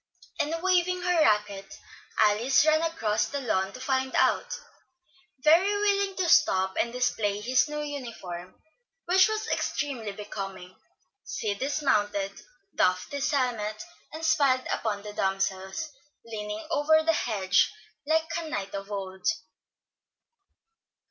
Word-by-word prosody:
and 295 - 0
waving 365 -1 +2
her 355 -2 +3
racquet, 210 -5 +1 0.4
Alice 225 +7 +4
ran 310 0 +4
across 275 -11 0
the 285 - -3
lawn 195 -7 0
to 255 - -10
find 260 0 -1
out. - - +2 0.8
Very 340 +6 +5
willing 400 -1 +1
to 370 -2 0
stop 190 - +4
and 235 - -2
display 220 -5 0
his 255 +7 +2
new 300 0 -3
uniform, 220 -11 -7 0.5
which 375 +3 +5
was 435 0 -2
extremely 255 -8 -2
becoming, 195 -3 -7 0.5
Sid 205 -2 -3
dismounted, 210 -9 0 0.4
doffed 185 0 +1
his 280 -1 -1
helmet, 225 -6 -1 0.3
and 320 +1 -5
smiled 275 -5 +3
upon 205 -3 -2
the 210 0 -7
damsels, 195 +8 -2 0.3
leaning 210 -1 -5
over 315 +1 +4
the 325 - +4
hedge 200 -9 +2 0.4
like 320 +1 +3
a 325 -2 -6
knight 200 -7 -4
of 200 +1 -6
old. 190 -2 -5
240 Hz, 125 wpm, -27 LUFS, 200-310 Hz, 0.8 s, Very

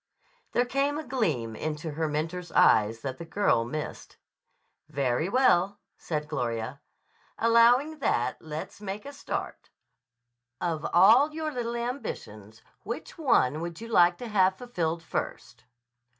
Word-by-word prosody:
There 245 - +3
came 275 +3 0
a 315 - -4
gleam 160 - -1
into 155 +3 -4
her 160 +2 -1
mentor's 165 +4 -3
eye 105 0 +5
that 130 -2 -4
the - - -5
girl 165 - +1
missed. 150 +6 -6 0.7
"Very 140 +4 0
well," 205 -5 +3 0.2
said 150 -2 -4
Gloria. 120 -2 -3 0.6
"Allowing 240 +7 +4
that, 125 - 0
let's 155 +5 -7
make 205 +2 -5
a 285 - -8
start. 285 - -5 0.9
Of 165 -3 -2
all 225 - +6
your 310 0 -3
little 240 -3 -3
ambitions 110 - -6 0.2
which 235 +8 -7
one 160 - +2
would 170 -1 -5
you 230 - -8
like 175 -5 +5
to 245 - -7
have 190 -3 +3
fulfilled 170 -9 -3
first?" 160 - -5
175 Hz, 135 wpm, -28 LUFS, 150-240 Hz, 0.9 s, all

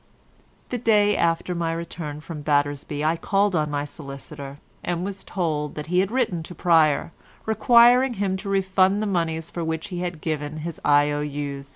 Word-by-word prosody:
The 245 - -2
day 210 -3 +3
after 170 +1 +1
my 170 -1 -1
return 165 -3 -6
from 160 -1 -7
Battersby 145 0 0
I 160 +2 +2
called 200 +2 +1
on 155 -2 +1
my 145 0 -2
solicitor, 140 -1 -9 0.3
and 175 0 -2
was 195 -1 -6
told 155 -5 -2
that 155 +3 -6
he 180 - +4
had 190 +1 +2
written 225 -8 0
to 175 +2 -9
Pryer, 160 -2 +3 0.3
requiring 240 +3 +5
him 195 -2 0
to 195 +1 -6
refund 195 +1 +2
the - - 0
monies 165 -4 -1
for 170 - -4
which 160 0 -3
he 180 - -4
had 175 -2 -4
given 155 -1 -3
his 170 -2 -6
I.O.U.'s. 145 -1 0
165 Hz, 175 wpm, -24 LUFS, 150-190 Hz, 0.3 s, requiring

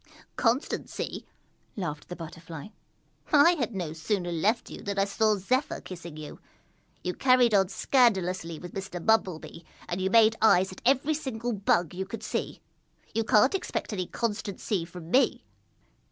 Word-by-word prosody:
"Constancy!" 245 +4 -1 0.5
laughed 155 -7 -5
the 180 - -5
Butterfly. 165 0 -9 0.6
"I 300 +3 +7
had 245 - -2
no 170 -5 -3
sooner 175 +2 -2
left 205 +8 0
you - - -8
than 200 0 -4
I 195 - +3
saw 215 +2 +2
Zephyr 260 - 0
kissing 170 -4 -9
you. 155 -1 -9 0.6
You 180 - -1
carried 255 -2 +4
on 195 -2 +4
scandalously 185 - +2
with 175 +2 -9
Mr. 190 -3 -6
Bumble 220 -6 +3
Bee 165 +1 -11 0.2
and 180 +2 -3
you 190 - +1
made 225 +1 +5
eyes 190 -4 +5
at 185 - -11
every 275 +3 +3
single 245 -5 -3
Bug 180 -5 +1
you 190 +1 -4
could 225 - -7
see. - - -4 0.5
You 225 +1 +1
can't 220 +4 +4
expect 380 - -3
any 185 -3 -2
constancy 205 -4 -2
from 170 -1 -10
me!" 265 - +3
200 Hz, 155 wpm, -28 LUFS, 175-230 Hz, 0.6 s, I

